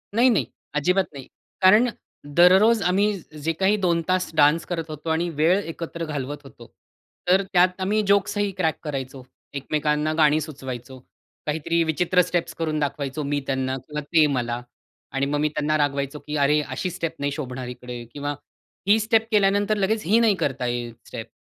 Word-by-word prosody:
नाही, 245 +3 +5
नाही. 180 - +2 0.3
अजिबात 180 +6 +2
नाही. 135 -2 -9 0.3
कारण 210 +6 +6 0.5
दररोज 190 +6 +6
आम्ही 200 +3 +2 0.3
जे 165 - +1
काही 195 +2 +3
2 175 -4 +1
तास 185 0 +1
डान्स 150 +2 +4
करत 165 -2 -4
होतो, 155 +1 -6
आणि 165 +2 0
वेळ 170 +5 +4
एकत्र 165 -2 -5
घालवत 145 -2 -4
होतो. 120 -4 -14 0.6
तर 190 +2 +4
त्यात 180 +1 +3
आम्ही 210 +3 +1
जोक्स 200 +1 +2
ही 205 -1 0
क्रॅक 160 -4 0
करायचो. 135 -3 -5 0.3
एकमेकांना 150 +2 0
गाणी 155 -1 +4
सुचवायचो. 130 -4 -7 0.5
काहीतरी 160 +2 0
विचित्र 175 +3 +2
स्टेप्स 175 -1 -2
करून 155 -2 -2
दाखवायचो 140 0 -2
मी 145 0 -1
त्यांना 130 -1 -1
किंवा 150 0 -4
ते 155 +1 +3
मला 120 -1 -2 0.5
आणि 135 0 0
मग 145 +1 -1
मी 150 +1 +1
त्यांना 150 +1 0
रागवायचो 140 0 -1
की 150 - -6
"अरे, 150 +1 +3
अशी 135 +5 -4
स्टेप 165 -2 -4
नाही 140 0 -1
शोभणार 130 -4 -5
इकडे" 125 -1 -7
किंवा 145 0 -3 0.5
"ही 210 +2 +5
स्टेप 225 +1 +2
केल्यानंतर 205 0 +3
लगेच 210 +2 0
ही 215 +7 +4
नाही 225 -3 +4
करता 135 -7 -2
येईल 120 -1 -3
स्टेप." - - -7
155 Hz, 170 wpm, -24 LUFS, 140-185 Hz, 0.6 s, कारण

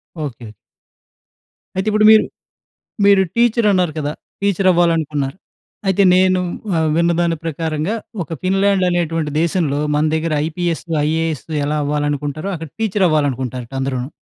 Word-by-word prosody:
Okay. 125 -8 -6 1.2
అయితే 190 +3 -2
ఇప్పుడు 215 0 +3
మీరు, 220 - +7 0.8
మీరు 200 -1 +6
టీచర్ 235 -1 +3
అన్నారు 180 -4 +1
కదా! 145 -1 -2 0.3
టీచర్ 200 -1 +1
అవ్వాలనుకున్నారు. 160 -4 0 0.5
అయితే 195 +1 +3
నేను 185 0 +3 0.3
ఆహ్, 160 -1 +1
విన్నదాని 170 0 +1
ప్రకారంగా 160 +4 -2 0.3
ఒక 155 - -17
'ఫిన్లాండ్' 195 0 +2
అనేటువంటి 165 -3 -1
దేశంలో, 165 -4 0 0.2
మన 150 - +2
దగ్గర 160 0 -1
ఐపీఎస్, 170 0 -2 0.2
ఐఏఎస్ 160 -1 -1 0.2
ఎలా 150 +1 -1
అవ్వాలనుకుంటారో 145 +3 -2
అక్కడ 160 -1 -7
టీచర్ 210 -3 +1
అవ్వాలనుకుంటారట 130 -5 -1
అందరును. 130 -1 -2
165 Hz, 120 wpm, -18 LUFS, 150-185 Hz, 1.2 s, మీరు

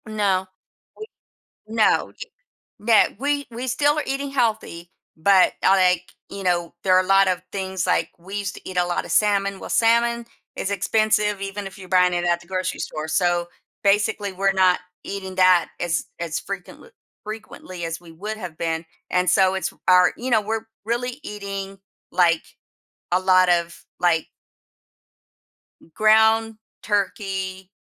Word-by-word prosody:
No, 200 -3 0 0.5
we 435 - -7 0.6
no, 220 0 +2
y - - -18 0.7
no, 220 0 +5
we 285 +1 -1
we 240 +2 -5
still 290 +4 +2
are - - +1
eating 275 +1 -3
healthy, 220 -9 -1 0.3
but, 190 +3 +4
uh, - - +4
like, 185 -2 +3 0.2
you 200 - -7
know, 175 -2 0
there 185 -1 +4
are 185 - +5
a - - -9
lot 195 0 +5
of 180 -1 0
things, 190 -2 -3
like, - - +1
we 190 +4 -8
used 200 -1 -3
to - - -11
eat 185 - -7
a 180 - +3
lot 175 - -2
of - - -6
salmon 200 -2 +2
well, - - -8
salmon 235 +1 +2 0.3
is 195 - -3
expensive 210 +1 +1
even 195 +1 -5
if 195 - -9
you're 185 -1 -11
buying 180 -1 +4
it 175 0 -1
at 175 0 +1
the 175 - -17
grocery 185 -1 -3
store, 155 0 -4
so, 175 +2 +1 0.4
basically 205 0 +2
we're 195 +1 +1
not 185 -2 +3 0.2
eating 190 -1 -6
that 185 -2 +5
as 170 -2 -1
as 170 -2 -3
frequentl 200 - -8 0.3
frequently 210 -5 -8
as 165 0 -4
we 175 -1 -15
would 210 +7 -6
have 180 -7 -8
been, 165 0 -2 0.3
and 180 -1 +2
so, 190 0 +4
it's 190 - -2 0.2
our 180 -1 +6
you 255 +2 -4
know, 220 -3 +4
we're 220 +1 -3 0.2
really 245 +4 -2
eating, 195 -3 -6 0.3
like, 170 -2 +3 0.7
a 180 - +3
lot 185 -1 +4
of, 170 -1 0 0.2
like 170 -3 +2 1.6
m 165 - -21
ground 220 +1 +4 0.3
turkey, 190 -2 -2
195 Hz, 165 wpm, -22 LUFS, 180-215 Hz, 1.6 s, our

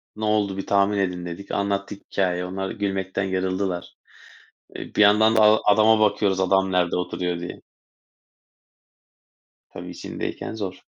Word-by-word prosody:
"Ne 110 - -4
oldu 105 -2 0
bir 95 - -4
tahmin 100 +1 +2
edin." 90 -2 -2
dedik, 85 +3 -8
anlattık 100 0 -2
hikâyeyi, 90 -2 0
onlar 95 +1 -4
gülmekten 95 -1 -2
yarıldılar. 95 -1 -2 0.8
E, - - -8
bir - - +3
yandan 110 +2 +5
da 110 - +5
a 105 0 +6
adama 110 +1 +4
bakıyoruz 100 -2 +2
adam 95 0 +2
nerede 90 -1 +1
oturuyor 90 -1 -2
diye. 85 - -8 2.1
Tabii, - - -9
içindeyken - - -6
zor. 100 -4 -6
95 Hz, 135 wpm, -23 LUFS, 95-105 Hz, 2.1 s, a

